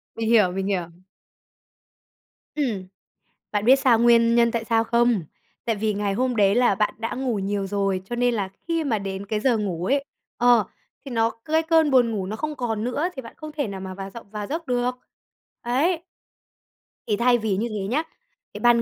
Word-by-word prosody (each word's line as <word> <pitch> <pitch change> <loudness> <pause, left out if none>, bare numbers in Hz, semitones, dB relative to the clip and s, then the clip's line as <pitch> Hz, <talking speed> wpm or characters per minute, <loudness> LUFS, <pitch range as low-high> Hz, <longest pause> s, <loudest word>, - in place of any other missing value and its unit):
Mình 225 0 -2
hiểu, 210 -6 +5
mình 195 +1 -3
hiểu. 180 -4 -1 1.7
Ừm. 225 -11 -2 0.7
Bạn 205 0 0
biết 260 +3 +7
sao 255 -4 +4
nguyên 235 0 +5
nhân 235 0 +4
tại 230 -1 -2
sao 225 0 +2
không? 235 -4 +2 0.4
Tại 225 -2 0
vì 215 0 0
ngày 200 -1 -1
hôm 250 +2 0
đấy 200 -1 +4
là 245 -4 +4
bạn 210 +1 0
đã 230 - -3
ngủ 250 -4 -1
nhiều 195 0 -2
rồi, 195 -1 -1
cho 240 +4 -5
nên 245 -1 +2
là 200 -3 -1 0.2
khi 330 -2 0
mà 225 -6 0
đến 195 0 -5
cái 210 0 -1
giờ 240 -2 +2
ngủ 180 -5 -2
ấy, 280 +5 +1 0.3
ờ, 240 -3 +5 0.4
thì 270 - -8
nó, 225 -1 +2
cái 320 +1 +2
cơn 320 -2 +3
buồn 245 -3 +4
ngủ 195 -4 -2
nó 215 - -4
không 300 +4 -4
còn 225 -3 -2
nữa 285 +8 -1
thì 265 - -5
bạn 230 - -11
không 310 -1 -8
thể 290 -7 -2
nào 195 -1 -6
mà 190 0 -6
vào 195 0 -7
giọng 230 -2 -11
vào 210 -1 -5
giấc 320 +1 -4
được. 245 0 0 0.7
Ấy. 300 +9 +1 1.1
Thì 210 - +2
thay 240 +1 +4
vì 215 -4 -1
như 235 +3 -1
thế 205 -3 -3
nhá, 285 +8 0 0.5
thì - - -7
ban 240 -1 +4
230 Hz, 205 wpm, -24 LUFS, 200-250 Hz, 1.7 s, biết